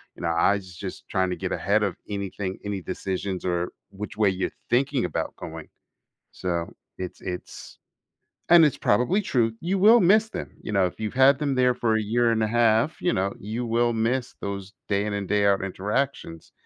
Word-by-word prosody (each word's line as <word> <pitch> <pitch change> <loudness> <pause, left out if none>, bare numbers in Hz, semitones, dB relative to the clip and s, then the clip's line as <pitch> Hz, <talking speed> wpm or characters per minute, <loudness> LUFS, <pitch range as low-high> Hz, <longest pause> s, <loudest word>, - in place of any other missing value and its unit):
you - - -12
know, - - -1
I 90 +5 +3
j 95 - -13
just 95 +1 -8
trying 95 -1 +1
to - - -1
get - - -4
ahead 105 +2 +1
of 100 -4 0
anything, 100 -1 -4
any 100 -2 -3
decisions, 95 0 -3
or 90 -1 -1 0.2
which 100 +1 -7
way 105 -2 +4
you're 95 0 -2 0.2
thinking 135 +1 +2
about - - -3
going." 80 -1 -8 0.6
So, 85 -2 -3 0.2
it's 90 -1 -6
it's 90 -1 -7 0.7
and 170 -2 +8
it's 145 - +1
probably 125 - +2
true; 120 - +1
you 190 +3 0
will 220 +4 +7
miss 210 +5 +5
them, 180 -4 -6
you - - -6
know, 95 -2 +3
if 90 - -5
you've 110 -1 -3
had 130 +1 +5
them 140 -3 0
there 125 -1 +3
for 115 -2 +1
a 110 - +1
year 115 +3 +2
and 110 -1 +1
a - - +1
half, 115 +5 +2
you 175 - +1
know, 95 +1 0
you 110 +4 -4
will 120 +1 +1
miss 120 +3 -1
those 100 0 -5 0.2
day 100 0 +1
in 105 - -2
and 100 -1 -3
day 105 -1 +2
out 100 -1 +2
interactions. 100 - -3
105 Hz, 200 wpm, -25 LUFS, 95-125 Hz, 0.7 s, and